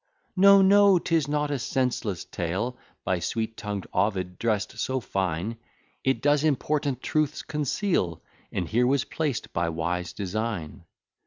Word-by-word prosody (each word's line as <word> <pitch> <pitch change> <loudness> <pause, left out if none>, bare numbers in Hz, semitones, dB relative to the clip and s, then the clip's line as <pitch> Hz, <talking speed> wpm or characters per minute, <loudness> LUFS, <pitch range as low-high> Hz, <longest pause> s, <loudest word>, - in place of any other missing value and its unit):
No, 200 +1 +7
no, 200 0 +6
'tis 165 -4 +1
not 150 0 0
a 140 - -1
senseless 120 -8 -1
tale, 95 +9 -3 0.3
By 95 -1 +1
sweet 110 +6 -2
tongued 105 -3 -4
Ovid 95 -2 0
dress'd 110 -3 -1
so 130 0 0
fine; 95 0 -2 0.5
It 135 0 0
does 145 0 +3
important 145 -2 0
truths 155 -1 0
conceal, 150 - -1 0.3
And 90 -3 -2
here 120 +6 +2
was 135 0 +2
placed 150 -6 -3
by 85 -3 0
wise 85 +2 -2
design. 100 -5 -4
115 Hz, 140 wpm, -26 LUFS, 95-145 Hz, 0.5 s, No